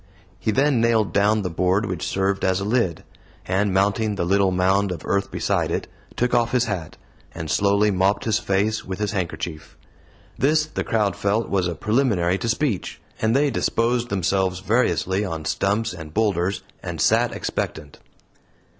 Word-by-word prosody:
He -, -, -2 dB
then 135 Hz, +2 st, +2 dB
nailed 115 Hz, -3 st, +2 dB
down 105 Hz, +1 st, +3 dB
the 90 Hz, -, -2 dB
board 90 Hz, +5 st, +1 dB
which 90 Hz, -4 st, -3 dB
served 95 Hz, 0 st, 0 dB
as 95 Hz, 0 st, +2 dB
a 100 Hz, -, -3 dB
lid; 105 Hz, -7 st, 0 dB, 0.4 s
and 95 Hz, +2 st, +1 dB
mounting 100 Hz, +3 st, +1 dB
the 85 Hz, -, -1 dB
little 100 Hz, +1 st, +3 dB
mound 95 Hz, +2 st, +2 dB
of 85 Hz, -4 st, -6 dB
earth 100 Hz, 0 st, 0 dB
beside -, -, 0 dB
it, -, -, -2 dB, 0.3 s
took 125 Hz, 0 st, 0 dB
off 120 Hz, -1 st, +2 dB
his 125 Hz, -1 st, +3 dB
hat, 95 Hz, -8 st, -5 dB, 0.4 s
and 80 Hz, -2 st, -4 dB
slowly 100 Hz, +1 st, +3 dB
mopped 95 Hz, +2 st, +1 dB
his 110 Hz, 0 st, +2 dB
face 105 Hz, +2 st, 0 dB
with 95 Hz, -1 st, -5 dB
his 105 Hz, -1 st, -1 dB
handkerchief. 85 Hz, -4 st, -5 dB, 0.6 s
This 155 Hz, +3 st, +3 dB
the 155 Hz, -, -4 dB
crowd 105 Hz, -5 st, 0 dB
felt 100 Hz, +3 st, 0 dB
was 95 Hz, -2 st, +1 dB
a 85 Hz, -, -3 dB
preliminary 105 Hz, -6 st, +1 dB
to 115 Hz, -, -2 dB
speech; 115 Hz, -4 st, -1 dB, 0.2 s
and 110 Hz, +2 st, +2 dB
they 140 Hz, +1 st, +3 dB
disposed 120 Hz, +1 st, 0 dB
themselves 95 Hz, -1 st, 0 dB
variously 95 Hz, -3 st, +1 dB
on 80 Hz, -6 st, -4 dB
stumps 105 Hz, +3 st, 0 dB
and 80 Hz, -3 st, -10 dB
boulders, 100 Hz, -4 st, 0 dB, 0.2 s
and -, -, -6 dB
sat -, -, +3 dB
expectant. 75 Hz, -3 st, -4 dB
100 Hz, 170 wpm, -23 LUFS, 95-110 Hz, 0.6 s, down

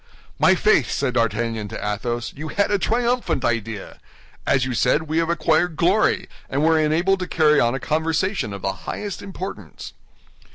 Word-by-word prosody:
"My -, -, +5 dB
faith," -, -, +3 dB
said 135 Hz, -3 st, -1 dB
D'Artagnan 115 Hz, -2 st, -1 dB
to -, -, -6 dB, 0.2 s
Athos, 120 Hz, +3 st, -4 dB
"you 155 Hz, +2 st, -6 dB
had 200 Hz, +5 st, 0 dB
a 205 Hz, -, +2 dB
triumphant 240 Hz, -, 0 dB
idea! 115 Hz, -3 st, -3 dB, 0.5 s
As 130 Hz, -2 st, +3 dB
you 130 Hz, -, -3 dB
said, 150 Hz, +6 st, +2 dB
we 160 Hz, +1 st, -1 dB
have 165 Hz, 0 st, 0 dB
acquired 170 Hz, 0 st, +1 dB
glory, 180 Hz, +7 st, +2 dB, 0.2 s
and 140 Hz, +3 st, 0 dB
were 160 Hz, 0 st, +4 dB
enabled 170 Hz, +5 st, +2 dB
to 180 Hz, -, -3 dB
carry 150 Hz, -2 st, +3 dB
on 120 Hz, +2 st, +2 dB
a -, -, -3 dB
conversation 160 Hz, -, -1 dB
of 100 Hz, -1 st, -7 dB
the 95 Hz, -, 0 dB, 0.2 s
highest 205 Hz, -3 st, -5 dB
importance." 195 Hz, 0 st, -8 dB
155 Hz, 170 wpm, -22 LUFS, 120-180 Hz, 0.5 s, My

